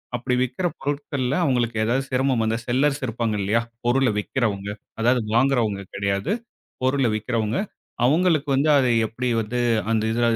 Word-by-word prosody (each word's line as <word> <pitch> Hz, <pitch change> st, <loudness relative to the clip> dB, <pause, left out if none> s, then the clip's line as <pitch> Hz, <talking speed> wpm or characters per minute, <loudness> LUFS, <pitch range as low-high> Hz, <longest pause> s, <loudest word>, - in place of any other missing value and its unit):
அப்படி 125 Hz, +1 st, -1 dB
விற்கிற 175 Hz, +8 st, -1 dB
பொருட்கள்ல 140 Hz, -2 st, -2 dB
அவங்களுக்கு 120 Hz, -4 st, +1 dB
ஏதாவது 130 Hz, +4 st, +1 dB
சிரமம் 130 Hz, -2 st, +1 dB
வந்தா 110 Hz, +1 st, 0 dB
செல்லர்ஸ் 135 Hz, +3 st, +1 dB
இருப்பாங்க 115 Hz, -1 st, -1 dB
இல்லையா? 105 Hz, +4 st, +2 dB, 0.2 s
பொருளை 125 Hz, 0 st, +3 dB
விக்கிறவங்க. 105 Hz, -3 st, -2 dB, 0.3 s
அதாவது 125 Hz, +2 st, +3 dB, 0.2 s
வாங்குறவங்க 120 Hz, -6 st, +2 dB
கிடையாது. 100 Hz, -, -1 dB, 0.5 s
பொருளை 130 Hz, -2 st, +2 dB
விக்கிறவங்க. 110 Hz, +1 st, -1 dB, 0.5 s
அவங்களுக்கு 155 Hz, 0 st, +2 dB
வந்து 145 Hz, +3 st, +2 dB
அதை 130 Hz, -3 st, +3 dB, 0.2 s
எப்படி 125 Hz, +3 st, -4 dB
வந்து 110 Hz, +3 st, -4 dB, 0.3 s
அந்த 110 Hz, -1 st, +1 dB
இது 120 Hz, -, -1 dB
125 Hz, 140 wpm, -23 LUFS, 110-135 Hz, 0.5 s, பொருளை